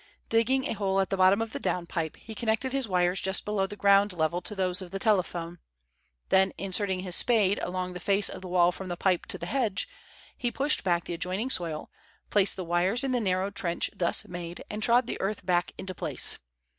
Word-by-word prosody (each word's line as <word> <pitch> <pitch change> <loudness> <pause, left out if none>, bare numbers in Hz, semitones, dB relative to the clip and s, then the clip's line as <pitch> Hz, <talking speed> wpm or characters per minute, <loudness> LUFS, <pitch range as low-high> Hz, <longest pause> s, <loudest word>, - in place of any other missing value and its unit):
Digging 260 +4 +2
a - - -1
hole 195 -2 0
at 195 - 0
the 195 - +1
bottom 190 +4 +5
of 225 - -8
the - - -3
down 180 -1 -1
pipe, 165 -2 -3
he 225 - -10
connected 230 +4 -1
his 270 -3 0
wires 180 0 +2
just 190 +1 -1
below 205 -2 0
the 205 - -7
ground 200 0 +4
level 170 +1 0
to 210 +4 -4
those 185 0 0
of 185 - -7
the 195 - -4
telephone. 175 -4 0 0.7
Then 190 0 +4
inserting 190 0 -1
his 180 -2 -1
spade 210 -5 +3
along 180 0 -3
the 180 - -6
face 200 +2 +2
of - - -4
the 185 - -7
wall 175 -1 +4
from 190 +1 -8
the 175 -1 -4
pipe 185 -2 +1
to 205 - -2
the - - -6
hedge, 225 -9 0 0.5
he 245 - -1
pushed 280 +5 +1
back 175 -2 +1
the - - -5
adjoining 185 +8 -2
soil, 165 -8 -3 0.4
placed 200 -1 +3
the 185 - -5
wires 180 +8 +1
in 270 - 0
the 250 - +2
narrow 190 -1 0
trench 180 -4 -1
thus 170 -2 +1
made, 175 -1 -7
and 210 - -4
trod 240 +3 +4
the - - -4
earth 200 0 -2
back 175 -1 +1
into 190 0 -5
place. - - -2
190 Hz, 220 wpm, -28 LUFS, 180-210 Hz, 0.7 s, bottom